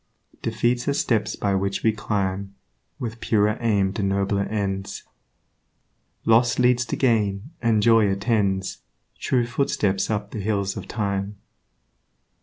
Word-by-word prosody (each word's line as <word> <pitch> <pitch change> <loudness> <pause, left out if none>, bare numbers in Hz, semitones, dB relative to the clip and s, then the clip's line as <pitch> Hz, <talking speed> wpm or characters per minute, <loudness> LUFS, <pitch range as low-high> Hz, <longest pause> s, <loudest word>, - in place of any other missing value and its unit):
Defeats 120 +1 0
are 140 - +1
steps 115 -6 0
by 100 -1 0
which 100 0 -1
we 110 - +4
climb 100 -2 -2 0.4
With 115 -1 -5
purer 105 0 +1
aim 100 -5 +1
to 105 - -3
nobler 100 0 0
ends; 100 -2 -3 1.2
Loss 120 +2 +4
leads 125 0 +3
to 115 - -3
gain, 110 -1 +1
and 110 -3 +2
joy 115 -2 +5
attends 100 -2 0 0.4
True 125 -2 +1
footsteps 105 -6 0
up 105 -1 -2
the 110 - -5
hills 100 -1 -1
of - - -7
time. 100 -1 -2
105 Hz, 130 wpm, -24 LUFS, 100-115 Hz, 1.2 s, joy